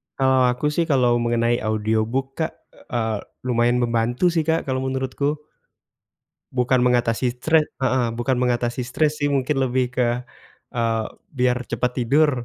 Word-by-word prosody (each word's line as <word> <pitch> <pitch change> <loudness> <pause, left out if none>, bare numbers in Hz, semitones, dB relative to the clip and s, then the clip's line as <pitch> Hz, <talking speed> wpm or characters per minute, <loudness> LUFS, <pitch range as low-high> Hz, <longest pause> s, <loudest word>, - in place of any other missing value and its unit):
kalau 130 -1 +3
aku 135 +4 -1
sih, 165 +2 +1
kalau 125 -4 +3
mengenai 120 0 +1
audiobook 110 +5 -1
Kak, 160 - 0 0.2
eee, 110 -3 -3 0.2
lumayan 120 0 +2
membantu 120 +7 +1
sih, 165 -2 0
Kak, 160 0 +2
kalau 130 0 0
menurutku. 130 +2 -1 1.2
Bukan 125 0 +2
mengatasi 120 0 +2
cre 160 +3 +4 0.2
heeh, 130 -1 +2
bukan 120 +3 -1
mengatasi 120 0 0
stres 150 +5 0
sih, 145 - +1
mungkin 135 +1 0
lebih 130 0 +1
ke, 125 - +3 0.7
eee, 115 -1 +1 0.3
biar 125 -2 +1
cepat 125 +1 -1
tidur. 135 +1 +2
125 Hz, 140 wpm, -22 LUFS, 120-135 Hz, 1.2 s, cre